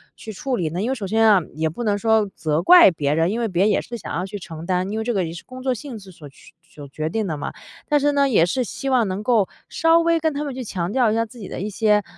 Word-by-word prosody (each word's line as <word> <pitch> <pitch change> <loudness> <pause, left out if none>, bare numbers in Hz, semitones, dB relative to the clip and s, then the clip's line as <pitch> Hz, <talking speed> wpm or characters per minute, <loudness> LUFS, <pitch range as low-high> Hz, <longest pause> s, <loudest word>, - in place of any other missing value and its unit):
去 220 - -9
处 255 +6 -3
理 165 -6 -1
呢？ 175 +3 -4
因 230 - -1
为 265 - +1
首 200 -5 -5
先 225 +2 +3
啊， 200 -4 +5
也 160 0 0
不 235 +10 -6
能 205 -2 +1
说 220 -1 +2
责 155 0 -1
怪 345 - +8
别 145 -3 -1
人， 165 +4 +1
因 230 - -2
为 230 - 0
别 180 -1 +1
人 210 - +3
也 - - +1
是 240 -1 -7
想 - - -7
要 175 - -1
去 205 +2 -6
承 160 -3 -9
担， 185 +1 0
因 220 - -2
为 - - -2
这 240 - -1
个 190 -3 +1
也 165 - -6
是 170 - -9
工 255 0 -10
作 260 -1 +1
性 245 0 -8
质 195 -2 -13
所 150 -4 -13
去 - - -19
所 150 -4 -13
决 155 +3 -4
定 220 +3 -2
地 160 -5 -3
嘛。 - - -5 0.4
但 295 -1 +4
是 290 +1 +2
呢， 280 -1 +2
也 170 -8 +4
是 255 +8 -1
希 270 +3 -5
望 245 -5 +2
能 190 +3 -4
够， 220 -5 +2 0.2
稍 330 +1 +3
微 335 0 +2
跟 315 0 0
他 290 +1 -3
们 280 -3 -4
去 255 - -5
强 185 -4 -3
调 245 -4 +2
一 - - 0
下 230 0 +1
自 240 +2 -15
己 200 - -7
的 - - -6
一 200 - -3
些 210 0 +2
210 Hz, 340 characters per minute, -22 LUFS, 180-250 Hz, 0.4 s, 怪